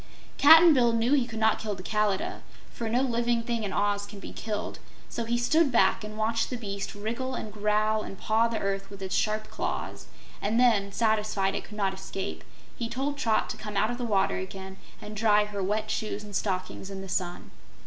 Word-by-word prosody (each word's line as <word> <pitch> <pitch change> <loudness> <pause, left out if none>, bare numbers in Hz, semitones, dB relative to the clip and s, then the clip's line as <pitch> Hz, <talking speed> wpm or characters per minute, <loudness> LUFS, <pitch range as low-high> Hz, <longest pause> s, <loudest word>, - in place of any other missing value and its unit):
Cap'n 320 +3 +9
Bill 240 -4 +4
knew 230 +4 +2
he 265 -4 +3
could 225 -2 -7
not 220 0 +3
kill 210 -2 -3
the 185 - -9
Kalidah, 210 -1 0 0.3
for 230 -2 -4
no 245 +4 +2
living 235 -2 +1
thing 230 -1 -2
in 200 - -2
Oz 205 0 0
can 205 -1 -10
be - - -9
killed, 215 -1 -4 0.3
so 235 - -3
he 235 +1 0
stood 295 +5 +3
back 195 -3 +3
and 215 0 -7
watched 225 +1 0
the 250 - -3
beast 200 -3 -5
wriggle 235 +5 -3
and 215 -3 -6
growl 215 +1 +1
and 195 - -8
paw 220 +3 +2
the 230 -1 -2
earth 195 -1 -2
with 195 -1 -9
its 190 - -4
sharp 215 0 0
claws, - - -4 0.3
and 215 +3 +1
then, 215 -5 +3
satisfied 210 -3 +1
it - - -4
could 210 - -11
not 195 -2 +1
escape, 190 0 -5 0.3
he 230 -1 -4
told 270 +4 -2
Trot 230 -6 +1
to - - -6
come 210 -2 -5
out 215 +3 +2
of 245 - -5
the - - -2
water 205 -5 +1
again 190 0 -7 0.2
and 210 +1 -8
dry 210 -1 +4
her 205 -1 -5
wet 215 +3 -1
shoes 210 -1 -3
and 205 -1 -8
stockings 185 -1 -2
in 195 -1 -6
the 195 - -7
sun. 180 -1 -3
215 Hz, 215 wpm, -28 LUFS, 200-235 Hz, 0.3 s, Cap'n